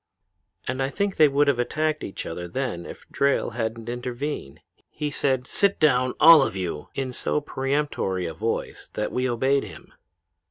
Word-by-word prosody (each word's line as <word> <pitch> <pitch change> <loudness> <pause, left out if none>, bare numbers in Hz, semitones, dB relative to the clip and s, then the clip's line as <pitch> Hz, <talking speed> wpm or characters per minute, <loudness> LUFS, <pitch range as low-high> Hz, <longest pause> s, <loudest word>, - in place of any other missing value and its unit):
"And 130 +1 -2
I 135 - 0
think 200 +6 -2
they 155 - +7
would 145 +1 +2
have 140 -4 +2
attacked 155 +5 -1
each 95 - -6
other 90 +1 -5
then 90 -4 -3
if - - -11
Drayle 140 -3 +1
hadn't 115 0 -4
intervened. 125 - -5 0.3
He 150 -1 -4
said, 130 -3 +1
'Sit 200 +7 +1
down! 130 -4 +3
All 165 -1 +9
of 135 - 0
you!' 90 -5 -4
in 130 -2 -3
so 150 - 0
peremptory 135 -10 -1
a 80 - -4
voice 110 +8 -3
that 105 - -2
we 125 0 0
obeyed 130 +4 +2
him. - - -12
130 Hz, 170 wpm, -25 LUFS, 115-145 Hz, 0.3 s, All